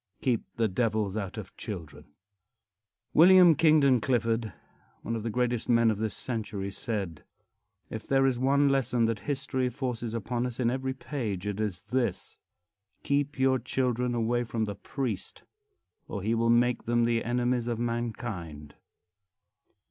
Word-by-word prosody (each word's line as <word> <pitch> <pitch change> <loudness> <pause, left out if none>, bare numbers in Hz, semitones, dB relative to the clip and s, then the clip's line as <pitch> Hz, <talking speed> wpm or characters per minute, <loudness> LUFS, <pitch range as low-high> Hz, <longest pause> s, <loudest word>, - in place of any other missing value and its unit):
VIII. 130 - +3
KEEP - - -18
THE 115 -1 +2
DEVILS 105 -1 0
OUT 100 -4 -4
OF - - -8
CHILDREN. 85 -8 -7 1.1
William 180 0 +8
Kingdon 150 -4 +4
Clifford, 115 -1 0 0.5
one 115 - -2
of 115 - -3
the 115 - -3
greatest 120 0 -1
men 115 -1 +5
of 105 - -3
this 110 -2 -2
century, 105 -5 -4
said: 95 - -4 0.7
"If 110 - -6
there 135 0 +3
is 130 -3 +1
one 140 +2 +3
lesson 125 -3 +2
that 115 -2 -1
history 130 -2 -1
forces 120 -3 -4
upon 120 +2 -2
us 125 0 -7
in 120 -2 +2
every 130 0 -2
page, 110 -10 -4
it 105 0 -3
is 100 -5 -2
this: 120 -7 -2 0.6
Keep 145 0 0
your 130 0 +3
children 125 0 -1
away 120 +1 +1
from 115 -1 -2
the 105 - -4
priest, 120 -1 -5 0.6
or 100 -3 -5
he 110 +3 +1
will 115 0 +1
make 120 +1 +3
them 120 0 +2
the 115 -1 +1
enemies 120 0 0
of 120 -1 -1
mankind." 110 - -4
120 Hz, 155 wpm, -28 LUFS, 110-130 Hz, 1.1 s, William